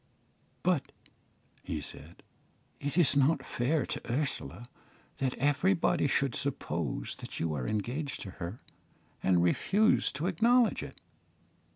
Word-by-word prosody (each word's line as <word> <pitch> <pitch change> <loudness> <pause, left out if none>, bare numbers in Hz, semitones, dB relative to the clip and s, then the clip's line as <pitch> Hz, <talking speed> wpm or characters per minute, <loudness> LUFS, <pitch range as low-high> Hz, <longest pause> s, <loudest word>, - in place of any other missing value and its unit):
"But," - - +1 0.7
he - - -3
said, - - -10 0.6
"it 145 +3 -3
is 170 -6 +5
not 140 0 +3
fair 140 +5 0
to - - -5
Ursula 120 - -2 0.5
that 130 -3 -1
everybody 155 +3 +2
should 140 -1 +1
suppose 85 - -2
that - - -7
you 80 -1 0
are 65 -4 -2
engaged 125 +8 -2
to 95 - -6
her, 85 +7 -5 0.6
and 90 -2 +3
refuse 205 - +3
to 150 +4 -3
acknowledge 230 +7 +3
it." - - -9
140 Hz, 125 wpm, -31 LUFS, 105-160 Hz, 0.7 s, is